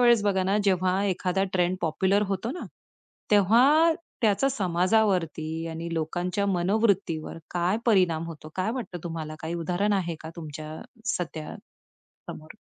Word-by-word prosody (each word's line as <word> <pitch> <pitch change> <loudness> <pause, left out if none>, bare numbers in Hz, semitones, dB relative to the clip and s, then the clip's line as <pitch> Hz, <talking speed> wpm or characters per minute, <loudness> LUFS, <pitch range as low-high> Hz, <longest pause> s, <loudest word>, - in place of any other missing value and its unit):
वेळेस 240 -3 +5
बघा 195 -2 +2
ना, 195 +2 +2
जेव्हा 185 0 +2
एखादा 190 0 0
ट्रेंड 180 0 +1
पॉप्युलर 190 +5 +2
होतो 195 +4 -2
ना. 360 - -6 0.7
तेव्हा 250 - +5 0.3
त्याचा 220 +5 +3
समाजावरती 180 - +1
आणि 165 +1 -5
लोकांच्या 175 +5 -1
मनोवृत्तीवर 190 -3 +1
काय 175 +3 +1
परिणाम 180 -7 +3
होतो? 155 -2 -9
काय 185 +3 0
वाटतं 235 -8 -5
तुम्हाला 160 -2 -5
काही 160 +1 -4
उदाहरण 180 +5 0
आहे 180 -4 0
का 160 - -8
तुमच्या 155 -2 -7 0.5
सध्या 160 -3 -5 0.8
समोर? 155 +5 -9
185 Hz, 130 wpm, -26 LUFS, 165-205 Hz, 0.8 s, वेळेस